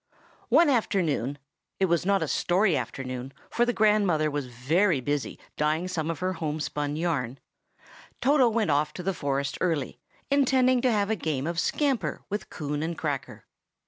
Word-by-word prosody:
ONE 340 - +6
afternoon 170 - +1 0.4
(it 190 - +4
was 170 0 +1
not 200 -1 +3
a - - -2
"story" 185 0 +2
afternoon, 130 +1 -4 0.2
for 240 - +2
the - - +3
grandmother 205 -9 +3
was 145 -2 -3
very 150 +8 +1
busy, 145 +2 -2 0.2
dyeing 155 +4 +1
some 165 -3 -2
of 165 - -2
her 185 +4 -1
homespun 150 -2 -3
yarn) 145 -7 -1 0.8
Toto 265 -1 +4
went 220 -7 +1
off 150 +1 +1
to 180 - -7
the 195 +2 0
forest 140 -3 -2
early, 160 -7 -1 0.3
intending 255 -2 +4
to 255 -1 +3
have 205 -1 +1
a - - +2
game 155 -7 -2
of 170 0 -2
scamper 275 - 0
with 205 -1 -4
Coon 145 -1 -4
and 165 +1 -3
Cracker. 135 -8 -4
165 Hz, 165 wpm, -27 LUFS, 145-205 Hz, 0.8 s, ONE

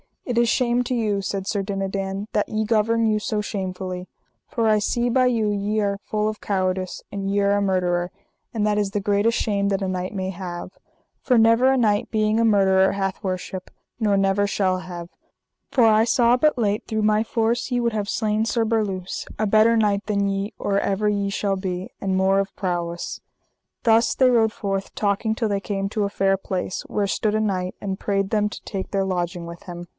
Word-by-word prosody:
It 245 -2 -2
is 235 0 +4
shame 240 +1 +2
to 250 - -1
you, 210 -4 0
said 195 0 -3
Sir 200 0 -1
Dinadan, 195 0 -3
that 210 - 0
ye 215 0 -1
govern 225 +1 +2
you 215 -1 +2
so 215 -1 -2
shamefully; 185 -2 -4 0.4
for 230 -2 -1
I 215 -1 +4
see 240 +4 0
by 255 +1 +3
you 230 -4 +2
ye 205 +1 0
are 200 -1 -1
full 215 0 0
of 215 - -6
cowardice, 185 -2 -2
and 195 -1 -3
ye 200 +1 +1
are 200 0 +3
a - - +1
murderer, 180 -2 0 0.4
and 215 -3 0
that 210 0 +1
is 205 -2 0
the 205 0 -1
greatest 205 +3 +2
shame 200 -2 0
that 195 -1 0
a 190 - -1
knight 185 +1 -3
may 190 -1 -2
have; 180 -1 -6 0.5
for 250 -2 +2
never 230 +3 +5
a - - +2
knight 210 -4 +2
being 215 0 +2
a 230 - +3
murderer 190 -3 +4
hath 195 -1 -2
worship, 185 -1 -4 0.3
nor 210 -3 +2
never 195 +1 +2
shall 185 -2 0
have; 175 -2 -8 0.6
for 250 - +3
I 220 0 +5
saw 240 +1 +4
but 300 +2 +2
late 210 -2 0
through 220 -1 -1
my 215 0 +3
force 230 +2 0
ye 245 -1 0
would 235 -1 0
have 210 -2 -2
slain 215 0 0
Sir 230 0 +1
Berluse, 205 -5 -2
a 215 - 0
better 215 +2 +4
knight 205 -2 +1
than 200 -1 0
ye, 195 +2 -2
or 200 0 0
ever 200 +2 0
ye 200 -1 0
shall 200 0 -1
be, 185 -1 -4
and 195 -1 -1
more 190 +1 +3
of 195 +1 -3
prowess. 175 -2 -3 0.6
Thus 230 0 +4
they 260 -1 +4
rode 225 -3 +3
forth 195 -2 -3
talking 210 +2 0
till 225 -1 -1
they 200 -1 0
came 195 0 -3
to 210 -1 -1
a - - -2
fair 195 -1 +1
place, 185 -1 -4
where 205 - -1
stood 210 +2 0
a 215 - +1
knight, 185 -4 -1
and 195 -1 -3
prayed 195 -1 0
them 210 -1 +1
to 210 - -8
take 190 -2 -5
their 195 -1 +1
lodging 175 -2 -2
with 170 0 -9
him. 175 -1 -8
205 Hz, 210 wpm, -23 LUFS, 195-220 Hz, 0.6 s, never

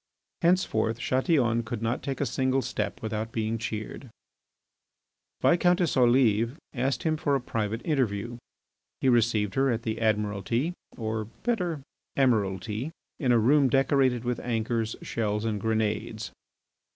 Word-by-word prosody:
Henceforth 165 -11 +2
Chatillon 125 -2 +2
could 115 0 -5
not 115 +2 -1
take 135 -2 -4
a 145 - +1
single 130 0 0
step 120 0 -3
without 110 +1 -3
being 110 0 -1
cheered. 115 +3 -5 1.3
Viscountess 175 0 +3
Olive 120 -1 +3 0.2
asked 130 +2 -1
him 155 -1 +1
for 145 -2 +1
a - - +1
private 115 -2 -3
interview. 120 - -1 0.6
He 135 - +2
received 110 -4 +2
her 135 0 +2
at 115 -2 -1
the 110 0 -3
Admiralty 110 - 0 0.2
in 110 -1 -4 1.9
a 120 - +5
room 135 +4 +4
decorated 135 -2 +2
with 125 -1 -1
anchors, 115 -1 -1
shells, 105 -1 -1
and 105 -3 -1
grenades. 110 -1 -1
120 Hz, 120 wpm, -27 LUFS, 110-135 Hz, 1.9 s, a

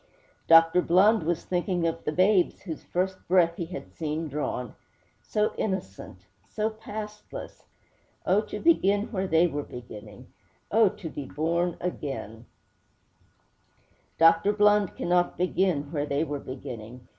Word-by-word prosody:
Dr. 165 +2 +6
Blund 195 +6 +4
was 170 0 -1
thinking 180 -1 -1
of 165 - -2
the - - 0
babes 185 +2 +2
whose 165 -5 -6
first 185 +1 -2
breath 170 -2 +3
he 170 - -4
had 180 +2 -8
seen 160 0 -3
drawn. 135 -5 -4 0.5
So 210 0 -1
innocent; 95 - -4 0.2
so 220 +1 -1
pastless! 215 -1 -8 0.6
Oh, 195 +3 +3
to 210 -1 -7
begin 205 - +2
where 190 -3 -2
they 165 0 +4
were 145 -4 -2
beginning! 115 -6 -11 0.4
Oh, 220 -1 +5
to 205 -3 -8
be 145 -3 -6
born 170 +5 -1
again!' 135 - -5 1.7
Dr. 165 +5 +5
Blund 210 -2 +3
cannot 175 0 +1
begin 180 -5 0
where 150 -2 -2
they 140 +2 0
were 145 -3 -4
beginning. 125 -2 -9
175 Hz, 135 wpm, -27 LUFS, 145-195 Hz, 1.7 s, Dr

